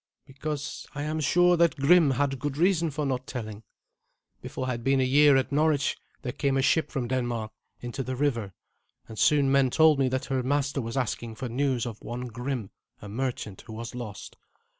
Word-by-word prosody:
"Because 145 +1 -5
I 145 - -3
am 155 +1 -2
sure 175 +3 +4
that 170 -1 +3
Grim 160 +2 +5
had 135 0 0
good 145 0 -3
reason 170 -1 +2
for 150 0 -3
not 130 -1 -2
telling. 110 -4 -6 0.8
Before 130 - -5
I 130 - -1
had 120 -1 -4
been 135 +1 +3
a - - +3
year 140 +2 +5
at 135 +2 -1
Norwich 145 -1 +2 0.3
there 125 - -2
came 135 +1 0
a - - +2
ship 160 +3 +2
from 130 -4 -3
Denmark 120 -3 -2 0.3
into 120 +2 -4
the 130 0 -3
river, 120 -9 -1 0.5
and 110 - -8
soon 145 -3 +4
men 135 -1 +4
told 155 +1 +5
me 130 -1 +3
that 130 0 -2
her 135 -1 -1
master 140 +1 0
was 115 +2 -5
asking 120 -2 -2
for 125 +2 -5
news 130 0 0
of 115 -3 -7
one 120 +2 -5
Grim, 125 -2 -4 0.3
a 105 - -10
merchant, 110 -3 -4
who 110 - -8
was 115 +1 -6
lost. 110 -7 -8
135 Hz, 200 wpm, -27 LUFS, 120-145 Hz, 0.8 s, Grim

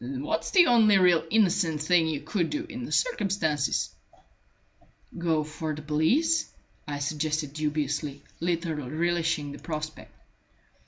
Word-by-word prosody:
What's 135 +6 -3
the 355 -3 +6
only 220 -7 +5
really 180 -3 +4
innocent 185 -7 +2
thing 165 0 +3
you 150 -3 -2
could 175 -6 -1
do 300 +1 -2
in 250 -6 -6
the - - -8
circumstances?" 190 - 0 1.2
"Go 165 -2 0
for 155 0 -5
the 150 - -9
police," 265 - +1 0.4
I 145 -1 -3
suggested 150 0 -2
dubiously, 150 -1 -2 0.2
little 165 -5 -2
relishing 165 -1 0
the - - -9
prospect. 155 -1 -6
160 Hz, 125 wpm, -27 LUFS, 150-185 Hz, 1.2 s, the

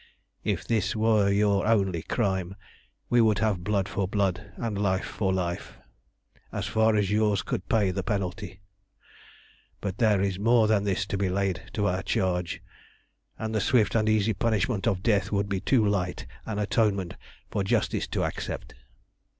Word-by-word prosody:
"If - - -1
this 110 -3 0
were 110 -2 +3
your 100 0 +2
only 95 -6 +2
crime 95 +1 -1 0.5
we 120 -1 +4
would 110 -2 +3
have 105 -6 0
blood 100 -1 0
for 100 -2 -2
blood, 100 0 -1
and 115 -3 -3
life 95 -2 +1
for 95 -3 -1
life, 90 -2 -3 0.7
as 100 -2 -3
far 110 +1 +2
as 100 -2 +1
yours 105 -4 +2
could - - -4
pay 105 -4 +3
the 95 - -2
penalty. 95 0 -3 1.2
But 100 -1 -4
there 110 -4 +4
is 95 -1 -1
more 115 +1 +4
than 105 -2 +2
this 100 0 0
to 100 0 -3
be 100 -2 +1
laid 95 -2 -1
to 105 - 0
our 95 -1 0
charge, 90 -2 -1 0.7
and 110 0 -4
the 110 - +1
swift 110 -3 +3
and 110 -1 +2
easy 110 0 +2
punishment 110 0 0
of 95 -5 0
death 100 -4 +2
would 100 -1 0
be 100 -2 -1
too 115 +2 +2
light 95 -4 -1 0.2
an 110 -2 -3
atonement 100 -3 +1 0.4
for 100 - 0
Justice 95 - 0
to - - -1
accept. - - -4
100 Hz, 165 wpm, -27 LUFS, 95-110 Hz, 1.2 s, we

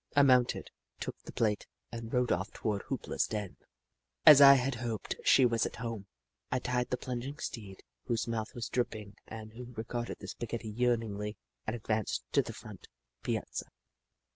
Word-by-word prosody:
I 145 - +7
mounted, 125 -2 +3 0.3
took - - -5
the - - -10
plate, 105 -3 0 0.2
and 115 -1 -6
rode 125 0 +2
off 95 +3 0
toward 105 -3 -2
Hoop - - -3
La's - - +1
den. 105 -4 -4 0.7
As 150 -2 +11
I 140 0 +11
had 135 +1 +1
hoped, 115 -3 -3
she 130 - +6
was 115 -1 +2
at - - -9
home. 115 -4 -5 0.4
I 130 - +2
tied 125 0 -1
the 125 - 0
plunging 130 +4 -4
steed, 105 -10 -6 0.2
whose 115 -1 0
mouth 110 -2 -3
was 120 -2 -3
dripping 110 -5 -2
and 110 -1 -8
who 125 +1 -9
regarded 120 +1 -3
the - - -9
spaghetti 115 -1 -4
yearningly, 110 -3 0 0.3
and 110 - 0
advanced 110 -2 -1
to - - +5
the - - -6
front - - -11 0.3
piazza. - - -2
115 Hz, 170 wpm, -32 LUFS, 110-125 Hz, 0.7 s, As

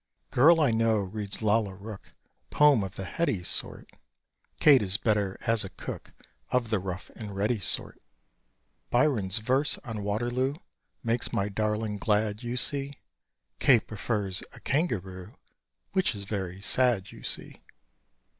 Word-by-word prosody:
Girl 165 +6 +6
I 145 -6 +3
know 115 0 +2
reads 100 +2 -4
Lalla 105 -2 +1
Rookh 100 +1 -10 0.4
Poem 145 -7 +4
of 95 - -7
the 95 - -6
"heady" 105 - -1
sort: - - -3 0.7
Kate 145 -4 +7
is 100 -1 +2
better 105 -4 0
as 115 -1 +2
a 95 - -6
cook - - -8 0.4
Of 120 -3 0
the 110 - +2
rough 90 -1 -6
and 105 -3 -8
ready 105 +3 0
sort. 90 - +2 0.9
Byron's 120 -7 +2
verse 130 +6 +2
on 115 -6 -5
Waterloo, 120 +6 -1 0.5
Makes 115 0 0
my 100 -3 -1
darling 105 +1 -2
glad, 105 0 0
you 120 0 -4
see: 140 +2 +3 0.7
Kate 125 -5 +5
prefers 105 -3 -2
a - - -12
kangaroo 95 - -2 0.6
Which 190 - +1
is 100 - -6
very 95 -2 -5
sad, 120 -3 +1
you - - -13
see. - - -2
110 Hz, 140 wpm, -27 LUFS, 100-125 Hz, 0.9 s, Kate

